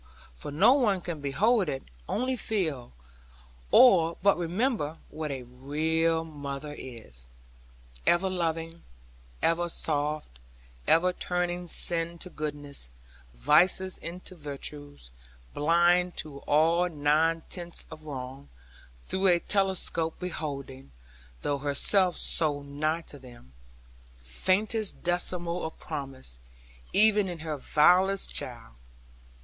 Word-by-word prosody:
for - - -8
no 180 - +5
one 220 -9 +2
can 170 -4 -5
behold 190 - +2
it 135 - -3 0.3
only 255 +3 0
feel, 165 - -2 0.8
or 170 -10 +6
but 200 0 +5
remember, 175 - -1
what 155 -1 -5
a 135 -2 -4
real 160 +6 0
mother 145 -1 -6
is. 110 - -10 0.8
Ever 175 +2 +4
loving, 165 -2 -2 0.6
ever 170 +1 +2
soft, 150 - -3 0.5
ever 180 +2 +4
turning 180 0 -2
sin 170 0 0
to 180 +2 -8
goodness, 145 - -6 0.5
vices 185 - +3
into 180 +2 -7
virtues; 145 - -7 0.4
blind 175 +3 +3
to 145 -3 -5
all 165 +4 +3
nine 160 +2 +2
tenths 175 -2 -5
of 155 - -10
wrong; 135 -1 -7 0.6
through 190 +1 +1
a 175 -2 +5
telescope 190 -4 -1
beholding 140 - -5 0.5
(though 145 -1 0
herself 175 +6 +1
so 145 -3 0
nigh 155 +3 -1
to 145 -3 -12
them) 120 - -15 0.7
faintest 195 - 0
decimal 175 0 0
of 160 - -5
promise, 130 - -7 0.5
even 210 -2 +4
in 175 - -5
her 155 -1 -3
vilest 180 +7 +3
child. - - -5
165 Hz, 110 wpm, -28 LUFS, 145-180 Hz, 0.8 s, or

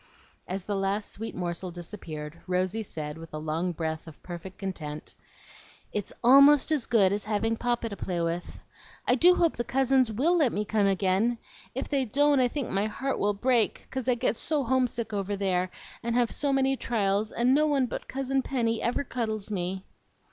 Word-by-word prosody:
As 185 0 -4
the 205 - -2
last 195 +2 -1
sweet 225 +2 -6
morsel 175 +1 -3
disappeared 170 -3 -8
Rosy 185 +4 0
said, 155 -6 -6
with 165 -1 -9
a - - -2
long 160 +4 -1
breath 160 -1 -4
of 155 - -13
perfect 180 +1 -8
content, 155 -6 -6 0.8
"It's 205 -2 -3
ALMOST 280 +4 +7
as 295 -6 +1
good 200 -5 +4
as 205 0 -2
having 220 +1 0
Papa 240 0 -1
to 200 - -6
play 180 -3 -3
with. 170 +1 -3 0.4
I - - +5
do 350 +8 +6
hope 335 -3 +2
the 240 - 0
cousins 260 -1 +2
WILL 290 +11 +2
let 275 -7 +3
me 210 +1 -1
come 210 -1 +2
again! 195 +4 +2 0.4
If 265 - -3
they 275 -2 +1
don't, 285 +4 +3
I 250 - +4
think 270 0 -4
my 200 +2 +1
heart 270 +5 -3
will 205 0 +1
break, 240 +1 +1
'cause 260 -1 -2
I 250 - +4
get 230 -1 0
so 295 +1 0
homesick 240 -3 0
over 200 0 -1
there, 185 -2 0 0.3
and 235 0 -2
have 240 -2 +2
so 285 -1 -1
many 270 0 +2
trials, 210 -4 0
and 245 +2 +2
no 305 +2 +4
one 280 -3 +2
but - - -6
Cousin 270 0 -1
Penny 230 -4 -1
ever 240 +4 0
cuddles 220 -5 -3
me." 190 0 -3
220 Hz, 190 wpm, -28 LUFS, 185-255 Hz, 0.8 s, ALMOST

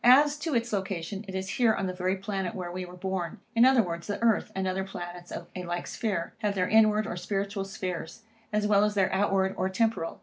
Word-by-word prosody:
As 285 +4 +7
to 300 -1 -2
its 235 -1 0
location, 195 0 -3
it 190 - -6
is 190 0 -2
here 230 -3 +5
on 195 - -1
the 185 - -2
very 185 +1 0
planet 195 +1 -3
where 180 -2 -4
we 185 +1 -4
were 180 0 -11
born; 185 -2 -2
or, - - -14 0.2
in 230 +2 +7
other 260 -3 +6
words, 170 -2 -5
the 205 - -2
earth 225 -3 +3
and 190 0 -1
other 190 +1 -1
planets 175 -2 -7
of - - -5
a 180 - -4
like 175 0 -3
sphere, 190 -7 -2
have 210 -2 0
their 180 -1 +1
inward 215 -1 +5
or 215 - -4
spiritual 195 +2 -2
spheres, 185 0 -5 0.3
as 210 0 +1
well 205 -1 +5
as 210 0 +1
their 195 -2 +2
outward, 190 -1 +2
or 185 - +1
temporal. 190 -3 0
195 Hz, 240 wpm, -28 LUFS, 185-215 Hz, 0.3 s, As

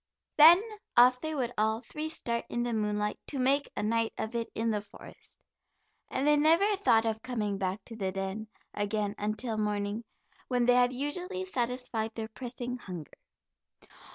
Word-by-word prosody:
Then 325 +4 +9 0.4
off 250 +1 +7
they 315 +1 -3
would 245 -3 -1
all 220 +1 +2
three 305 +6 -5
start 235 -7 -3
in 240 - -1
the 240 -1 -2
moonlight 210 -1 -1
to 285 - -4
make 275 +2 +2
a 205 - -1
night 225 +1 +1
of 220 - -4
it 235 -1 -2
in 225 +1 0
the 210 -1 -1
forest. 205 - -13 0.7
And 265 - -1
they 295 0 +5
never 330 +8 +4
thought 230 - +3
of 220 -1 -1
coming 210 -6 -2
back 190 +2 -2
to 230 - -9
the 195 -4 -2
den 195 +3 -4 0.3
again 205 0 -1
until 215 +2 -2
morning, 210 +1 -1 0.4
when 245 -2 +1
they 245 - +5
had 245 0 +4
usually 360 +8 -2
satisfied 245 -7 -2
their 220 -1 -4
pressing 245 +1 -5
hunger. 175 - -8
235 Hz, 170 wpm, -30 LUFS, 210-255 Hz, 0.7 s, Then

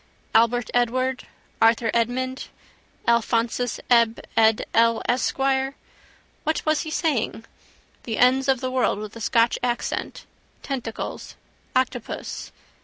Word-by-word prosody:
Albert 235 +1 +3
Edward, 255 +2 0 0.3
Arthur 225 0 +4
Edmund, 255 +3 -1 0.6
Alphonsus 235 +1 +1
Eb 235 -2 +4 0.2
Ed 220 -1 +4
El 230 0 +4
Esquire. 270 +2 +1 0.7
What 315 +1 -1
was 310 -1 +2
he 315 - -5
saying? 280 -8 -1 0.6
The 225 -2 -3
ends 260 +2 +4
of 265 -2 +2
the 255 -1 -2
world 255 -5 +1
with 210 +1 -7
a 230 - -9
Scotch 230 +1 +2
accent. 240 -1 -3 0.4
Tentacles: 250 -5 -5 0.4
octopus. 255 -2 -2
245 Hz, 110 wpm, -24 LUFS, 230-260 Hz, 0.7 s, Arthur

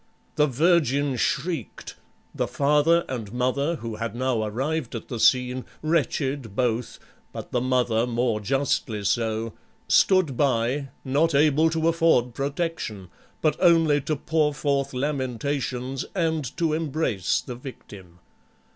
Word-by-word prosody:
The 150 0 +3
virgin 145 -2 +2
shrieked, 155 - -2 0.4
the - - -1
father 150 +4 +3
and 115 -6 -5
mother 130 +6 0
who 115 -6 -6
had 115 -1 -4
now 125 -2 0
arrived 130 +6 -2
at 115 - -7
the 120 - -4
scene, 125 +1 +3 0.2
wretched 140 -7 -1
both, 120 -1 -1 0.3
but - - -8
the 125 - 0
mother 125 -2 +1
more 120 -2 0
justly 115 -2 -1
so, 110 +1 -1 0.3
stood 185 -8 +4
by, 135 +1 0 0.2
not 145 +4 +2
able 150 +2 +4
to 160 0 0
afford 165 -8 +3
protection, 140 - -3 0.3
but 155 - +3
only 165 -4 +4
to 155 +3 -1
pour 150 0 0
forth 140 -2 0
lamentations 130 -1 -2
and 160 -7 -1
to 165 -2 +1
embrace 150 - 0
the 125 - -7
victim. 100 -8 -11
135 Hz, 130 wpm, -25 LUFS, 120-155 Hz, 0.4 s, stood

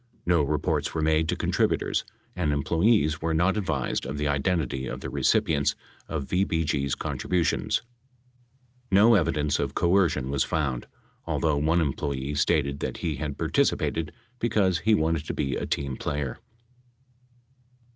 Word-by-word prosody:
No 85 -2 +3
reports 75 +1 -1
were 80 - 0
made 80 +1 +2
to - - +1
contributors, - - 0 0.3
and 80 -5 0
employees 80 +3 +2
were 80 -1 0
not 90 +4 +2
advised 80 - -1
of 70 +1 -4
the 75 0 -1
identity 70 -2 0
of - - -5
the - - -5
recipients 70 -3 +2 0.3
of 75 -4 -3
VBG's 80 -6 0
contributions. 90 +2 -1 1.1
No 105 +5 +6
evidence 75 -6 +1
of 70 -1 -2
coercion 85 -7 +2
was 70 -1 +2
found, 70 -6 -2 0.4
although 75 -3 +1
one 80 +4 +2
em 70 -4 0
ployee 70 0 -3
stated 70 -1 +1
that - - -3
he 80 -4 -2
had 75 -1 -4
participated 80 -2 0 0.3
because 95 -6 +2
he 110 +3 +3
wanted 80 -3 0
to - - -3
be 70 -3 -1
a - - -3
team 70 -2 -2
player. 70 -2 -3
75 Hz, 145 wpm, -26 LUFS, 70-85 Hz, 1.1 s, No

